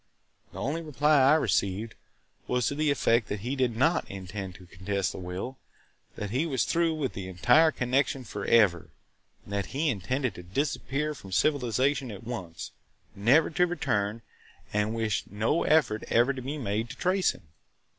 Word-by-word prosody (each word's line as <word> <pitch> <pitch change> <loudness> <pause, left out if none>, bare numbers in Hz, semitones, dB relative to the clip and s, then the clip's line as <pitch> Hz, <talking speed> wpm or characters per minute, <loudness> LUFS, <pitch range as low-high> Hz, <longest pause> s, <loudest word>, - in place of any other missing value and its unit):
The - - -8
only 150 +6 -2
reply 150 -1 +2
I 135 +3 +6
received 105 -4 0 0.5
was 125 -1 +1
to - - 0
the 150 +1 +1
effect 120 -5 +2
that 105 -1 -4
he 125 +5 -2
did 125 -4 0
not 160 +7 +2
intend 95 -1 -6
to 90 - -13
contest 95 +1 -2
the - - -8
will, 95 +9 -6 0.6
that 105 -1 -5
he 135 +8 0
was 130 -6 +1
through 165 -1 +1
with 140 -5 -2
the 95 -1 -6
entire 125 - +5
connection 135 0 0
forever, 105 -4 +2 0.6
that 100 -1 -3
he 150 +4 0
intended 125 +5 -2
to - - -9
disappear 140 +8 -2
from 100 -9 -12
civilization 130 +3 +1
at 100 -1 -8
once, 95 -9 -6 0.4
never 125 +13 +4
to 180 +3 +2
return 110 -10 -1 0.5
and 105 +2 0
wished 110 -3 -1
no 110 - 0
effort 150 -9 +3
ever 120 +4 +3
to 130 - -6
be 140 +4 -4
made 115 -3 -2
to 130 - -9
trace 185 +1 +2
him. - - -16
120 Hz, 165 wpm, -28 LUFS, 100-145 Hz, 0.6 s, I